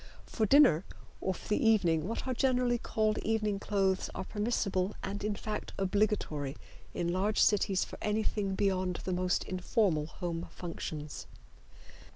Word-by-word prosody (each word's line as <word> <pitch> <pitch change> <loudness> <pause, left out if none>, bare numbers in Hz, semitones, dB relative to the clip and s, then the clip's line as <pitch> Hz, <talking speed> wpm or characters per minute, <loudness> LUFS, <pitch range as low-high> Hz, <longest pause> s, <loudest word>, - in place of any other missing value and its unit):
For 220 -2 0
dinner 265 - +6 0.4
or 190 - -1
for - - -11
the 210 - +1
evening 180 -8 +3
what 230 - -3
are 260 - 0
generally 250 -2 +2
called 215 -1 0
evening 215 -2 0
clothes 195 -2 0
are - - -3
permissible, 205 -2 -1
and 200 +1 -4
in 210 0 0
fact 210 +1 -5
obligatory 190 -8 0 0.4
in 170 0 0
large 200 +4 +1
cities 195 -2 +3
for - - -10
anything 210 -2 0
beyond 185 -2 0
the 185 - -2
most 180 0 +1
informal 185 -4 0
home 170 +1 -4
functions. 155 -3 -6
195 Hz, 145 wpm, -31 LUFS, 180-215 Hz, 0.4 s, dinner